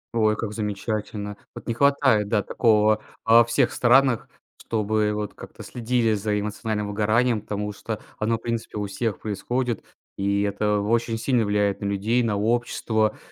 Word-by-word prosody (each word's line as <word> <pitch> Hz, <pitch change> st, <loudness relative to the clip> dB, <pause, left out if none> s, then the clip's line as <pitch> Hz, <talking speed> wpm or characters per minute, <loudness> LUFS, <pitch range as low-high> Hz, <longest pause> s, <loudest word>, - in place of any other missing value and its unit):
Ой, 110 Hz, -2 st, +3 dB
как 105 Hz, -1 st, -4 dB
замечательно. 105 Hz, -1 st, -3 dB, 0.2 s
Вот -, -, -9 dB
не 115 Hz, -, 0 dB
хватает, 135 Hz, -5 st, +3 dB
да, 105 Hz, -1 st, +1 dB
такого 110 Hz, -2 st, +3 dB, 0.2 s
во 115 Hz, +1 st, +7 dB
всех 120 Hz, +2 st, +1 dB
странах, 125 Hz, -1 st, +3 dB, 0.3 s
чтобы 110 Hz, -1 st, 0 dB
вот 105 Hz, -1 st, -4 dB
как-то -, -, -11 dB
следили 120 Hz, -1 st, 0 dB
за 105 Hz, 0 st, 0 dB
эмоциональным 105 Hz, 0 st, -3 dB
выгоранием. 110 Hz, +3 st, +1 dB
Потому 105 Hz, 0 st, -4 dB
что 110 Hz, +1 st, -5 dB, 0.2 s
оно, 110 Hz, +2 st, +1 dB
в -, -, -17 dB
принципе, 115 Hz, -2 st, -4 dB
у 105 Hz, -, -2 dB
всех 100 Hz, +1 st, -3 dB
происходит, 120 Hz, +4 st, -2 dB, 0.3 s
и 100 Hz, +1 st, +1 dB
это 105 Hz, +1 st, 0 dB
очень 115 Hz, +2 st, 0 dB
сильно 120 Hz, 0 st, +1 dB
влияет 100 Hz, -1 st, 0 dB
на -, -, -3 dB
людей, 100 Hz, +5 st, +1 dB
на 110 Hz, -4 st, 0 dB
общество. 110 Hz, 0 st, 0 dB
110 Hz, 160 wpm, -24 LUFS, 105-115 Hz, 0.3 s, во